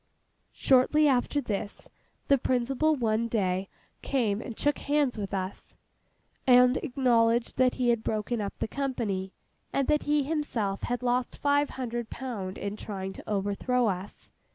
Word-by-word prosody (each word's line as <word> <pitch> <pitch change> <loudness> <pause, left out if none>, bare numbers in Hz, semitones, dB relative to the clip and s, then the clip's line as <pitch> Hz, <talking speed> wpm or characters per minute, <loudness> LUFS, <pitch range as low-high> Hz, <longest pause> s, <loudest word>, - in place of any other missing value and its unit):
Shortly 280 +4 +4
after 275 +2 +2
this, 205 -4 -5 0.4
the 280 -1 +4
principal 260 +6 +1
one 230 -3 0
day 190 -4 -1 0.3
came 225 -6 0
and 235 -3 -7
shook 290 0 +1
hands 290 -3 +1
with 200 -3 -4
us, 190 -1 -5 0.7
and 250 0 +6
acknowledged 240 -4 +2
that 255 -1 +4
he 250 -2 +1
had 235 -2 +1
broken 215 +1 -1
up 200 - -5
the - - -2
company, 220 -9 -2 0.4
and 275 -1 0
that 300 -1 +3
he 295 0 +1
himself 260 -10 -2
had 245 +1 -2
lost 245 0 0
five 285 0 +2
hundred 240 -3 -4
pound 210 -8 -5
in 205 +1 -4
trying 195 -3 -5
to - - -11
overthrow 210 +5 0
us. 190 +1 -6
240 Hz, 150 wpm, -28 LUFS, 205-265 Hz, 0.7 s, and